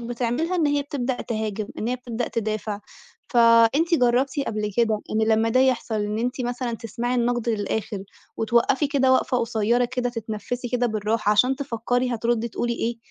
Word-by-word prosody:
بتعملها 245 +9 -1
إن 320 -3 +2
هي 290 0 +1
بتبدأ 265 -3 -3
تهاجم، 215 -2 -3
إن 225 - -2
هي 250 - 0
بتبدأ 240 -1 -4
تدافع. 215 -2 -3 0.5
فأنتِ 235 +7 +5
جربتِ 260 +1 +2
قبل 210 -1 -2
كده 220 -3 +2
إن 220 0 +1
لمّا 220 +1 +3
ده 255 +3 +3
يحصل، 255 -3 +1
إن 210 0 -1
أنتِ 250 +3 -2
مثلًا 245 0 -2
تسمعي 235 +2 -3
النَّقد 240 -1 0
للآخر، 205 -1 -2 0.4
وتوقَّفي 235 +5 +2
كده 265 -2 +2
وقفة 260 0 +2
قصيرة 230 +1 +1
كده 245 0 -2
تتنفِّسي 230 +2 -5
كده 245 0 +1
بالرَّاحة، 215 -1 0
عشان 255 +5 +3
تفكَّري 245 -2 -1
هتردّي 235 0 0
تقولي 235 +2 -2
إيه، 235 +1 -2
235 Hz, 165 wpm, -24 LUFS, 220-250 Hz, 0.5 s, فأنتِ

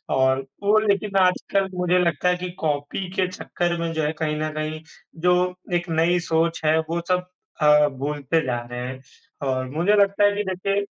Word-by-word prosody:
और 130 0 +2 0.2
वो 205 +2 +4
लेकिन 205 -1 0
आजकल 190 +1 +2
मुझे 180 0 +2
लगता 180 0 +1
है 180 - +2
कि 180 0 -5
कॉपी 150 +4 -2
के 185 - +2
चक्कर 175 -1 -2
में 165 0 -2
जो 160 -1 -1
है 150 - +1
कहीं 155 -2 0
न 155 - -1
कहीं, 155 0 -4 0.4
जो 180 +1 +2 0.2
एक 175 0 -1
नई 165 +2 +2
सोच 165 0 +1
है, 155 +1 +4
वो 165 +2 -2
सब 180 0 +1 0.4
अ, 150 0 +6
भूलते 145 +3 -1
जा 125 -2 -1
रहे 120 - -4
हैं 130 0 -7 0.5
और 130 -1 -1
मुझे 170 +9 +1
लगता 200 0 +3
है 205 - +6
कि 205 - -1
देखिए, 195 +2 -1
170 Hz, 190 wpm, -23 LUFS, 150-180 Hz, 0.5 s, अ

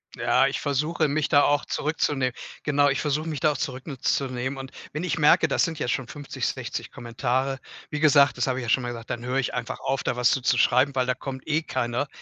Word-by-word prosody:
Ja, - - +3
ich - - -2
versuche 150 +3 0
mich 150 +1 0
da 145 -3 +5
auch 145 0 +2
zurückzuneh 145 -4 0 0.3
genau, 145 -1 +3
ich 140 - 0
versuche 150 +2 -1
mich 150 -5 -4
da 155 - +4
auch - - -4
zurücknu 135 +2 -5
zunehmen 130 +1 -1
und 135 0 -7 0.2
wenn 155 +3 -3
ich 180 - -1
merke, 150 - +5
das - - +2
sind 165 -2 -5
jetzt 120 - -1
schon 130 -3 -2
50, 145 +1 -4
60 - - -4
Kommentare, 130 +3 -2 0.3
wie 150 - -3
gesagt 140 -4 +5
das 125 - 0
habe 130 0 0
ich - - -5
ja 115 - -4
schon 130 - +3
mal 120 - -3
gesagt, 115 -2 -8
dann 120 0 -4
hör 125 +2 -1
ich 130 - -1
einfach 125 -1 -4
auf, 135 0 -1
da - - 0
was 125 0 +3
zu - - +2
zu 125 - +2
schreiben, 135 +4 +3
weil 130 -1 +2
da 130 - +2
kommt 130 +1 -7
eh 155 +1 +1
keiner. 130 -2 -2
135 Hz, 245 wpm, -25 LUFS, 125-145 Hz, 0.3 s, da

